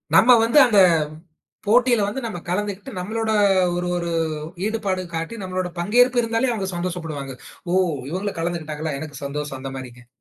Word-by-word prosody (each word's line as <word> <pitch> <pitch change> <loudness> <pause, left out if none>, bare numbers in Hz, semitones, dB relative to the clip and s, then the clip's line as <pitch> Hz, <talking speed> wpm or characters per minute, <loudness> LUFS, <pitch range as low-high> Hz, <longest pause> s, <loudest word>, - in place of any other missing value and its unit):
நம்ம 250 - +7
வந்து 230 +5 +2
அந்தப் 190 -8 +5 0.7
போட்டியில 240 -1 +4
வந்து 210 +6 -3
நம்ம 215 -6 -4
கலந்துக்கிட்டு 205 +5 -3
நம்மளோட 220 +4 -2 0.5
ஒரு 180 0 -2
ஒரு 170 -1 -2 0.5
ஈடுபாடு 200 -4 -1
காட்டி 165 +7 -4
நம்மளோட 185 -1 -3
பங்கேற்பு 245 +7 +3
இருந்தாலே, 230 +2 0
அவங்க 195 -4 -3
சந்தோஷப்படுவாங்க. 165 -6 -4 0.4
ஓ - - +1 0.4
இவங்களும் 190 +1 -3
கலந்துக்கிட்டாங்களா, 155 -3 -3
எனக்குச் 145 -2 -7
சந்தோஷம் 145 -1 -5
அந்த 135 0 -5
மாரிங்க. 125 -2 -10
185 Hz, 140 wpm, -22 LUFS, 160-220 Hz, 0.7 s, நம்ம